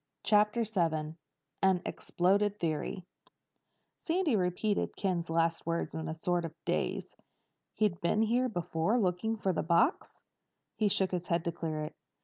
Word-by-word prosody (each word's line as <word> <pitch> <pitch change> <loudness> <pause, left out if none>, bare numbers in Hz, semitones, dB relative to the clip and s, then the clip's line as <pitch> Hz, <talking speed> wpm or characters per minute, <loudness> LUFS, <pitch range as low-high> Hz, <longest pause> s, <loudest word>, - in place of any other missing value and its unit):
CHAPTER 210 +2 +3
VII 165 -7 0 0.5
AN 190 -2 +3
EXPLODED 200 +3 +1
THEORY 170 +3 -2 1.0
Sandy 335 -6 +1
repeated 195 +2 0
Ken's 180 -4 -1
last 165 0 +1
words 165 0 -1
in 160 -1 -4
a 160 - -3
sort 175 +1 0
of 165 -1 -6
daze. - - -2 0.6
"He'd 210 -5 +1
been 210 +6 +2
here 245 +3 +2
before 175 +2 0
looking 215 +2 0
for 195 -3 0
the - - 0
box?" 170 - +1 0.5
He 215 - +2
shook 190 -1 +1
his 180 -1 -3
head 170 0 0
to 170 - 0
clear 155 -2 -3
it. 150 - -6
180 Hz, 145 wpm, -31 LUFS, 165-210 Hz, 1.0 s, CHAPTER